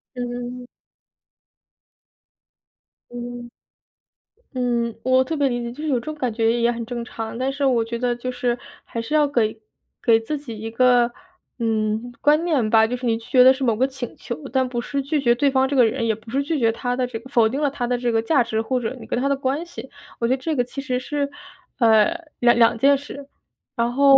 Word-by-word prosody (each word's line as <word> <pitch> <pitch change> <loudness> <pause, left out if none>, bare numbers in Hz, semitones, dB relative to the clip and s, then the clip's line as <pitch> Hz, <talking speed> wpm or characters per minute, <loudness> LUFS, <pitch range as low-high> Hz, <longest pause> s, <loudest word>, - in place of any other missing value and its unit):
嗯。 245 0 -5 2.5
嗯。 240 0 -7 1.1
嗯， 235 -2 -1
我 255 0 +4
特 315 +4 -3
别 285 -1 +2
理 245 -2 -1
解， 235 0 -4
就 300 +6 -8
是 310 - -1
有 255 -4 +2
这 235 - -12
种 310 - -4
感 255 -6 -2
觉 225 0 +2
也 235 0 +2
很 235 -1 -4
正 235 0 -5
常， 225 -1 -6
但 260 +2 -1
是 280 +1 -3
我 245 -4 +3
觉 235 +1 -4
得 245 0 0
就 255 +1 -4
是 245 -1 -1 0.3
还 230 - -6
是 230 +6 -4
要 300 -1 +4
给 225 -5 0 0.4
给 225 -2 +4
自 285 +7 -4
己 240 -6 -8
一 220 +1 -6
个， 245 0 +4 0.5
嗯， 220 +1 -1
观 300 +2 +3
念 290 -10 +1
吧， 220 0 +5
就 250 +2 -3
是 250 - -6
你 230 -1 +2
拒 225 - -13
绝 250 -1 +6
的 260 +1 +8
是 265 +1 -5
某 235 -4 +2
个 250 +5 +2
请 265 -3 -6
求， 240 - -5 0.2
但 260 0 +1
不 240 -1 -3
是 275 +3 -3
拒 295 +1 0
绝 240 -3 +4
对 275 +3 +2
方 265 0 +3
这 280 - -2
个 250 -3 +6
人， 230 +1 -1
也 220 - +1
不 220 +1 -13
是 275 +3 +1
拒 310 +3 -1
绝 230 -4 +3
他 245 +2 -2
的 255 0 0
这 245 -2 -6
个 250 +4 -14
否 235 -5 +4
定 265 +6 -3
了 290 - +2
他 265 -3 -3
的 245 +1 0
这 245 -1 -1
个 225 -1 +1
价 270 +1 +3
值， 220 -1 -2
或 250 +3 0
者 235 +2 -3
你 - - -10
跟 245 - -2
他 275 - +1
的 280 - +2
关 275 +3 -1
系， 345 - -9 0.3
我 235 - 0
觉 255 - +3
得 - - -7
这 315 +2 -1
个 245 - +2
其 250 +3 -7
实 255 -3 -1
是， 285 +2 -2 0.5
呃， 230 +7 +4 0.2
两 240 -1 +5
两 230 0 +5
件 275 +5 +4
事。 285 0 -10 0.5
然 235 -1 0
后 275 +1 +7
245 Hz, 250 characters per minute, -22 LUFS, 235-270 Hz, 2.5 s, 的